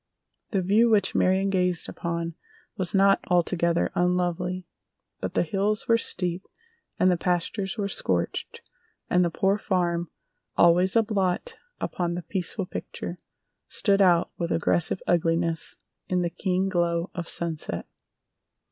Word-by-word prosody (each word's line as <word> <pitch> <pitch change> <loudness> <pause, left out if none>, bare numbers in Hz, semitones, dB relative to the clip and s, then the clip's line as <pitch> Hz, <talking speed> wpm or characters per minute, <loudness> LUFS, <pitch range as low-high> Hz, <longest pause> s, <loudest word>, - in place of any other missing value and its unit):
The 195 -4 0
view 215 +6 +4
which 205 -3 +3
Marion 190 +1 +2
gazed 180 -2 +1
upon 170 -1 -3 0.4
was 185 0 -1
not 195 0 +5
altogether 170 -1 +2
unlovely, 180 0 0 0.5
but - - -4
the - - +3
hills 200 +5 -1
were 230 - +5
steep 180 -4 -2 0.6
and 185 - +4
the 175 - +2
pastures 180 +4 -1
were 205 -2 -1
scorched 90 - -2 0.5
and 180 0 +4
the 170 - +2
Poor 195 +4 +1
Farm, 175 -4 0 0.5
always 180 +3 +5
a 230 - +5
blot 205 - -1 0.2
upon 175 -1 -2
the 175 - -4
peaceful 190 +2 -3
picture, 180 0 -6 0.5
stood 200 -2 +2
out 175 -3 +4
with 170 -1 -1
aggressive 170 +2 +1
ugliness 165 -1 +1 0.3
in 180 -1 +1
the 170 - -1
keen 185 +2 0
glow 170 -1 0
of 175 -2 -5
sunset. 160 - -3
180 Hz, 135 wpm, -26 LUFS, 170-195 Hz, 0.6 s, not